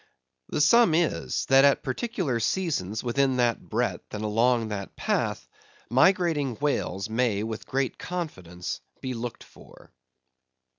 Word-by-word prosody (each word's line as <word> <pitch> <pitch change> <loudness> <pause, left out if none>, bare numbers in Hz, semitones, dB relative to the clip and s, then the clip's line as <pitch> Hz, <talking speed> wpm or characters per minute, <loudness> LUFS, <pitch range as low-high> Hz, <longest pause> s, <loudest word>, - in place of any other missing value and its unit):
The - - 0
sum 175 +2 +5
is, 85 - 0
that 135 +1 +6
at 140 -1 +4
particular 150 - -2
seasons 110 - -1
within 130 +2 +1
that 120 -2 +1
breadth - - -3
and 105 - -4
along 115 +2 +2
that 100 -2 -5
path, - - -1 0.4
migrating 150 -2 +3
whales 110 -8 -1
may 110 -2 0
with 110 -1 -5
great 135 -1 -1
confidence 90 - -5 0.2
be 130 -1 -4
looked 120 0 -6
for. - - -17
125 Hz, 130 wpm, -26 LUFS, 110-150 Hz, 0.4 s, that